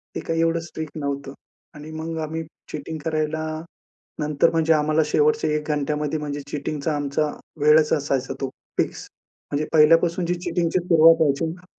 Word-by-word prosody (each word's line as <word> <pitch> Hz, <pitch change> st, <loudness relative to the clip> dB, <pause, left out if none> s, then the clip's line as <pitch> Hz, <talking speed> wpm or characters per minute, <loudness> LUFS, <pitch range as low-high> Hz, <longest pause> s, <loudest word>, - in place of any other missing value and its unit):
ते -, -, -2 dB
काय 165 Hz, 0 st, -2 dB
एवढं 165 Hz, 0 st, +2 dB
स्ट्रिक्ट 160 Hz, -1 st, -7 dB
नव्हतं. 140 Hz, -2 st, -4 dB, 0.4 s
आणि 150 Hz, +1 st, -9 dB
मग 160 Hz, +1 st, -5 dB
आम्ही 160 Hz, +1 st, -3 dB, 0.3 s
चीटिंग 155 Hz, +2 st, -5 dB
करायला, 155 Hz, 0 st, -1 dB, 0.8 s
नंतर 150 Hz, -2 st, +2 dB
म्हणजे 165 Hz, 0 st, +3 dB
आम्हाला 155 Hz, +1 st, +2 dB
शेवटच्या 150 Hz, +1 st, +2 dB
1 150 Hz, 0 st, -3 dB
घंट्यामध्ये 150 Hz, +1 st, -1 dB
म्हणजे 145 Hz, -1 st, -4 dB
चीटिंगचा 150 Hz, +1 st, -2 dB
आमचा 145 Hz, +1 st, 0 dB, 0.3 s
वेळच 150 Hz, +1 st, +5 dB
असायचा 135 Hz, -3 st, -1 dB
तो 135 Hz, -, -1 dB, 0.3 s
फिक्स. -, -, -1 dB, 0.4 s
म्हणजे 145 Hz, +1 st, -1 dB
पहिल्यापासून 165 Hz, +3 st, +5 dB
जी 175 Hz, -, 0 dB
चीटिंगची 175 Hz, +1 st, +1 dB
सुरुवात 165 Hz, -2 st, +6 dB
व्हायची 145 Hz, 0 st, +2 dB
ना 175 Hz, +3 st, -7 dB
155 Hz, 155 wpm, -23 LUFS, 150-165 Hz, 0.8 s, सुरुवात